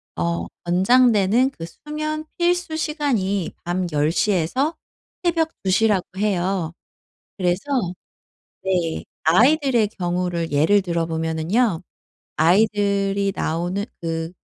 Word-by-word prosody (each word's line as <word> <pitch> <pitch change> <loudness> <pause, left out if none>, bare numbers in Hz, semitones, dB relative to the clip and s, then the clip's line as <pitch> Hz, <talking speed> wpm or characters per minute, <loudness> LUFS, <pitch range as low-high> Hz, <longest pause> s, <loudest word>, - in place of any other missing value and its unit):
어 85 0 -1 0.2
권장되는 215 +5 +4
그 165 -11 -8
수면 305 - -5
필수 350 -2 0
시간이 245 - -1
밤 175 +1 -1
10:00 155 +7 +1
에서 255 - 0 0.5
새벽 330 -2 +1
2:00 195 +4 +3
라고 200 -4 +1
해요. 190 -4 0 0.7
그래서 180 0 0 1.0
네 175 -4 -1 0.2
아이들의 245 - +4
경우를 175 -2 -1
예를 165 +8 +4
들어보면은요. 165 +4 0 0.5
아이들이 200 +2 +2
나오는 175 +5 -1 0.2
그 165 0 -3
190 Hz, 205 characters per minute, -22 LUFS, 170-245 Hz, 1.0 s, 권장되는